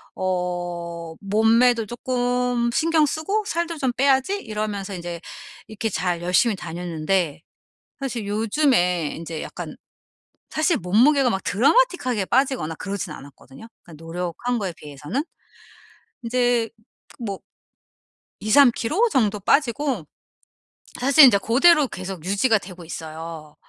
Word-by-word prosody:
'어 175 -2 -3
몸매도 225 +3 +3
쪼끔 245 0 -1
신경 320 +1 +3
쓰고 320 +9 -1
살도 340 -2 -2
좀 265 -3 +1
빼야지.' 270 +8 +2
이러면서 210 -2 -4
인제 175 -1 -6 0.5
이렇게 220 +1 -3
잘 175 -2 -2
열심히 185 +5 +3
다녔는데 170 -2 -2 0.6
사실 245 -6 -4
요즘에 205 - +1
인제 165 -1 -6
약간 - - -7 0.7
사실 315 +2 +1
몸무게가 245 - +3
막 190 -2 -2
드라마틱하게 255 - +2
빠지거나 255 - 0
그러진 190 -2 -5
않았거든요, 135 - -13 0.3
노력한 175 +9 -3
거에 190 -4 -3
비해서는. 150 - -5 1.0
인제 240 -1 +1
그 230 - -62 0.5
뭐 195 -3 -4 1.0
2-3kg 275 - +3
정도 215 - +1
빠지고 245 - +1 0.9
사실 275 +3 +7
인자 235 -6 +6
고대로 285 - +4
계속 185 -5 -7
유지가 205 +5 +2
되고 180 -2 -11
있어요. 160 -1 -8
215 Hz, 265 characters per minute, -23 LUFS, 175-255 Hz, 1.0 s, 사실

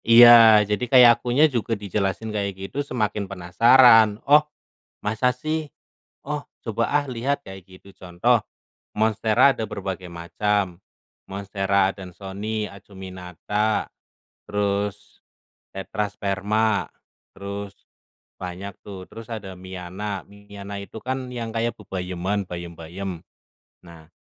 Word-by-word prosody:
Iya, 115 -2 +9
jadi 105 +3 -2
kayak 125 -2 +8
akunya 125 +6 +4
juga 120 -6 -1
dijelasin 100 +1 -2
kayak 100 -2 -2
gitu 95 +9 -4
semakin 105 -7 -2
penasaran. 110 +4 +5
"Oh 150 +2 +7 0.6
masa 110 +4 +1
sih? 155 +3 -4 0.5
Oh 150 +1 -3 0.2
coba 115 0 -1
ah 145 0 +1
lihat," 135 +2 -2
kayak 95 -1 -11
gitu 95 +1 -16
contoh, 95 +7 +1 0.6
monstera 110 +4 +3
ada 110 -3 -5
berbagai 95 -2 -5
macam, 90 +2 -2 0.5
Monstera 100 0 0
adansonii, 100 +3 -6
acuminata, 95 +2 -4 0.5
terus 105 0 -3 0.5
tetrasperma, 100 +1 -1 0.5
terus 100 0 -7 0.7
banyak 95 +2 -6
tuh, 95 -2 -8
terus 115 0 -11
ada 100 -4 -7
miana. 95 +2 -6
Miana 100 0 -9
itu 100 - -10
kan 130 0 -4
yang 115 -2 -4
kayak 115 +1 -1
bebayeman, 95 0 -3
bayem-bayem. 85 +1 -7 0.6
Nah, 85 -2 -15
100 Hz, 105 wpm, -23 LUFS, 95-115 Hz, 0.7 s, Iya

